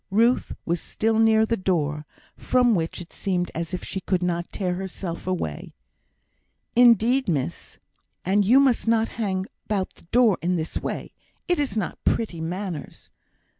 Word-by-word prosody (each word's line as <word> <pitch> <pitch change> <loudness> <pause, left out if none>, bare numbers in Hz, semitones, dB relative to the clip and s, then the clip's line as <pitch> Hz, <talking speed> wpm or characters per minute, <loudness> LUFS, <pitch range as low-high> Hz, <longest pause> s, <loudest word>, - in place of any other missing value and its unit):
Ruth 230 +5 +2
was 170 0 -1
still 220 0 0
near 220 0 +5
the 230 - 0
door, 150 -6 -1 0.3
from 250 -2 +3
which 165 -2 -1
it 170 - -12
seemed 180 -3 -1
as 165 0 -4
if 180 - -4
she 190 - -4
could 185 -1 0
not 175 -1 -2
tear 180 -3 -1
herself 180 -2 -5
away. 170 - -3 1.0
"Indeed, 240 +1 +5
miss, 135 - -3 0.5
and 200 +3 +3
you 240 +7 +6
must 265 -4 +2
not 225 0 +3
hang 190 -3 -1 0.2
about 195 -3 -2
the - - -21
door 230 +1 +3
in 180 +2 +1
this 160 -2 -3
way; - - -5 0.3
it 355 -2 +1
is 280 -6 -1
not 215 - -3
pretty 180 -8 0
manners. 175 -2 -5
190 Hz, 160 wpm, -24 LUFS, 175-225 Hz, 1.0 s, you